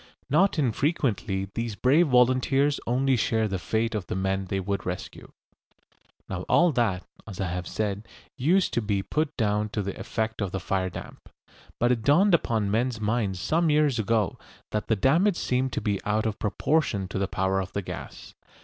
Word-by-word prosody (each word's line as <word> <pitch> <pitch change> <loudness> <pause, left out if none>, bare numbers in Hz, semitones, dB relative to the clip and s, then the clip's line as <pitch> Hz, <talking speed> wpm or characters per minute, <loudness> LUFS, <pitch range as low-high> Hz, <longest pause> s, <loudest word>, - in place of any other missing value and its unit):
Not 185 +5 +3
infrequently 115 - 0
these 115 -2 -3
brave 145 +10 +4
volunteers 130 +2 +3
only 130 +2 +2
share 110 -1 +1
the 95 -2 -3
fate 110 +5 -1
of 100 -5 -3
the - - -3
men 95 0 -1
they 95 +1 -2
would 100 0 -2
rescue. 90 0 -6 1.0
Now 90 -2 -4
all 175 -1 +5
that, 110 -9 0 0.2
as 100 -4 -8
I 95 -2 -1
have 90 +1 -4
said, 105 0 -3 0.3
used 170 +8 +2
to 120 - +1
be 100 -2 -1
put 155 +5 -2
down 105 -2 +1
to 105 -1 -2
the 100 0 -4
effect 110 +2 -3
of 100 -3 -2
the 95 - -2
fire 95 0 -1
damp. 90 - -10 0.5
But 120 +1 +3
it 120 -2 +1
dawned 170 - +4
upon 110 -10 +1
men's 120 +2 0
minds 105 -3 -1
some 165 - +1
years 150 -5 +3
ago 110 -3 0 0.3
that 105 - -2
the 110 - +2
damage 170 - +3
seemed 130 +1 0
to - - -2
be 100 -2 -1
out 105 +1 0
of 110 -1 -2
proportion 105 -1 0
to 95 - -3
the 100 - 0
power 95 +1 0
of 95 0 -7
the 100 - -2
gas. - - -8
110 Hz, 185 wpm, -26 LUFS, 100-130 Hz, 1.0 s, all